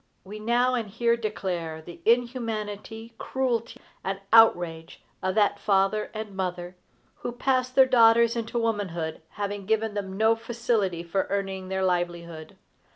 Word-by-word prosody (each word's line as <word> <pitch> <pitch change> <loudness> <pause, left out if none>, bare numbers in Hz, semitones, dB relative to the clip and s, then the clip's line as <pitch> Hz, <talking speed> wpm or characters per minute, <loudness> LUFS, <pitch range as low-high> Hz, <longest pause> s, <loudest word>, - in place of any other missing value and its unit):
We 210 +3 -9
now 240 +3 +2
and 230 -4 -2
here 235 +3 +1
declare 180 -8 -3
the 170 +1 -12
inhumanity, 225 -2 -1
cruelty, 245 -3 -2 0.2
and 195 0 -3
outrage 175 -7 +4 0.2
of 185 0 -1
that 205 -1 +2
father 195 +1 +1
and 215 -2 -7
mother, 180 -1 -4 0.4
who - - -4
pass 255 +1 0
their 260 +1 +6
daughters 235 -1 +5
into 230 0 -3
womanhood, 195 -9 -2
having 205 -1 -4
given 220 0 +1
them 195 -2 -4
no 220 +2 +4
facility 225 -6 -1
for 180 +3 -1
earning 195 -1 -3
their 190 0 0
livelihood. 170 -3 -3
210 Hz, 140 wpm, -26 LUFS, 185-230 Hz, 0.4 s, their